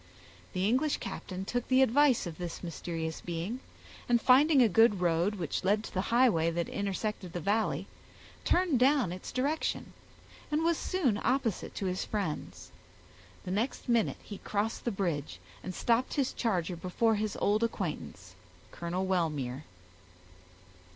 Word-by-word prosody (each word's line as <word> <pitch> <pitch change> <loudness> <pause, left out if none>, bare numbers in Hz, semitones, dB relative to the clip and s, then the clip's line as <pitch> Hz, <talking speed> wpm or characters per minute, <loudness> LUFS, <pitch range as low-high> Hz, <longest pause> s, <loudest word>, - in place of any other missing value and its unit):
The 185 +1 +1
English 265 +6 +2
captain 190 0 -6
took 245 +3 -2
the 260 0 +5
advice 265 -1 +4
of 170 -1 -7
this 175 0 -5
mysterious 165 -1 -4
being, 175 +8 -4 0.5
and 240 -1 +5
finding 275 +5 +5
a - - +5
good 220 -1 +4
road, 175 +3 +1
which 175 -3 -3
led 205 +3 +2
to - - -9
the 185 - +1
highway, 230 -10 +4
that 170 0 -1
intersected 200 -2 -3
the 175 - -2
valley, 210 +6 0 0.6
turned 350 -8 +2
down 260 - +4
its 180 +1 -7
direction, 285 +5 -1 0.6
and 305 +2 +1
was 335 -1 +2
soon 275 - 0
opposite 245 -5 0
to 195 - -3
his 185 0 -1
friends. 200 -8 -4 0.7
The 180 - -4
next 220 +7 -2
minute 235 -3 +2
he 205 - -8
crossed 210 +2 -2
the 240 - +1
bridge, 160 - -2 0.2
and 185 -1 -5
stopped 235 +2 +1
his 275 -3 0
charger 185 -6 -1
before 185 +7 +1
his 215 0 -2
old 210 +2 +2
acquaintance, 155 - -4 0.4
Colonel 175 +2 -3
Wellmere. 150 -7 -1
205 Hz, 150 wpm, -31 LUFS, 175-245 Hz, 0.7 s, the